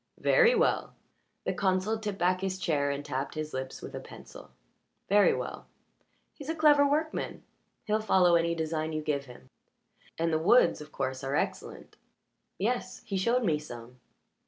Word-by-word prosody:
"Very 485 0 +5
well." 480 +2 +1 0.5
The - - 0
consul 190 +3 0
tipped 210 -3 -4
back 185 +1 +1
his 190 -1 -2
chair 150 -6 0
and 140 +1 -3
tapped 135 +3 -4
his 155 0 -4
lips 130 0 -5
with - - -8
a - - -5
pencil. - - -12 0.6
"Very 205 +1 +5
well. - - -5 0.7
He's 285 0 -10
a 325 - -1
clever 295 -2 +5
workman. 310 +2 -2 0.4
He'll 215 +1 +1
follow 185 -5 +4
any 170 0 +2
design 160 -1 -2
you 155 0 -3
give 140 -2 -1
him, 125 0 -14 0.7
and 165 0 0
the 155 - +2
woods, 175 -1 +4
of 150 0 -11
course, 130 0 -3
are 135 +1 -2
excellent." - - -4 0.6
"Yes. 215 -2 -2
He 200 - -4
showed 235 +6 +1
me 160 -7 +1
some. 125 -3 -11
175 Hz, 165 wpm, -29 LUFS, 150-215 Hz, 0.7 s, Very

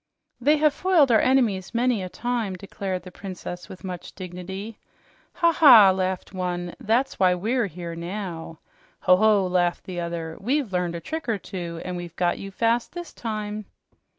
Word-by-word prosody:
"They 295 +5 +4
have 300 -1 +3
foiled 325 -5 +3
our 220 - +6
enemies 230 -7 +2
many 240 -3 +2
a 185 - -5
time," 235 -3 -2
declared 190 -1 -5
the 185 - -10
Princess 180 -2 -7
with 190 - -11
much 180 -2 -7
dignity. 190 +4 -7 0.5
"Ha 340 -1 +3
ha!" 240 -12 +8
laughed 185 0 -2
one. 175 -1 -3
"That's 235 +5 0
why 185 -1 +4
we're 225 +5 0
here 170 -1 -7
now." 170 -2 -6 0.4
"Ho 185 - +6
ho!" 210 -1 +4
laughed 180 -1 +1
the 180 -2 -5
other. 170 -1 -4
"We've 255 -1 0
learned 180 -1 0
a 170 - -5
trick 320 - -5
or 220 - +1
two, 170 -3 -6
and 180 -1 -3
we've 175 -1 -7
got 175 -1 0
you 195 - -6
fast 230 +4 0
this 345 -3 -7
time." 215 -2 -4
190 Hz, 175 wpm, -25 LUFS, 180-235 Hz, 0.5 s, ha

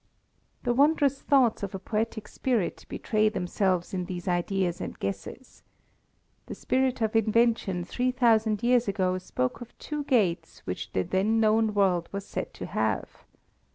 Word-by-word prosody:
The 240 - +1
wondrous 280 0 +3
thoughts 260 -5 +3
of 200 -1 -4
a - - -2
poetic 220 +2 -3
spirit 235 -9 -2
betray 215 -1 +1
themselves 185 -2 -1
in 180 -1 -2
these 175 -1 -6
ideas 180 0 0
and - - -5
guesses. 100 - -6 0.9
The - - -6
spirit 260 -1 0
of 220 0 0
invention 225 -4 +2
three 250 +6 -1
thousand 225 -4 +2
years 245 -1 +3
ago 185 -2 0
spoke 125 - -3
of 240 - -11
two 300 -1 -4
gates 210 - 0
which 90 - -5
the 95 - +1
then 205 - +1
known 220 -1 +3
world 185 -4 +2
was 200 0 -5
said - - -5
to - - -6
have. - - -2
215 Hz, 155 wpm, -27 LUFS, 185-240 Hz, 0.9 s, wondrous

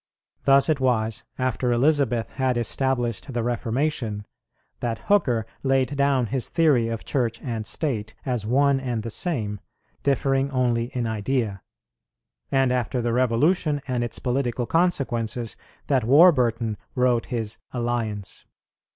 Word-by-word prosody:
Thus 135 0 +5
it 155 -3 +1
was 115 -3 0
after 130 -1 0
Elizabeth 125 -2 +2
had 130 -2 0
established 120 +1 -1
the 120 -2 -1
Reformation 120 -2 -1 0.5
that 115 -2 -2
Hooker 125 - +1 0.2
laid 135 +1 +1
down 140 -3 +2
his 125 +2 -2
theory 145 -9 +3
of 115 -1 -5
Church 120 -4 -1
and 115 -4 -4
State 110 -9 -3
as 125 -5 -1
one 135 +4 +3
and 120 -4 -3
the 115 - -4
same, 105 - -2 0.4
differing 135 0 +1
only 125 -3 +1
in 120 0 -3
idea; 110 -2 -1 0.9
and, 135 -2 +3
after 125 0 0
the 120 -1 0
Revolution 145 +6 +2
and 125 -2 -1
its 120 - -4
political 125 -1 -1
consequences, 120 -9 0 0.3
that 135 -4 +2
Warburton 120 - +4 0.2
wrote 125 -2 +2
his 115 -2 -3
"Alliance." 115 -5 -3
125 Hz, 130 wpm, -24 LUFS, 115-135 Hz, 0.9 s, Thus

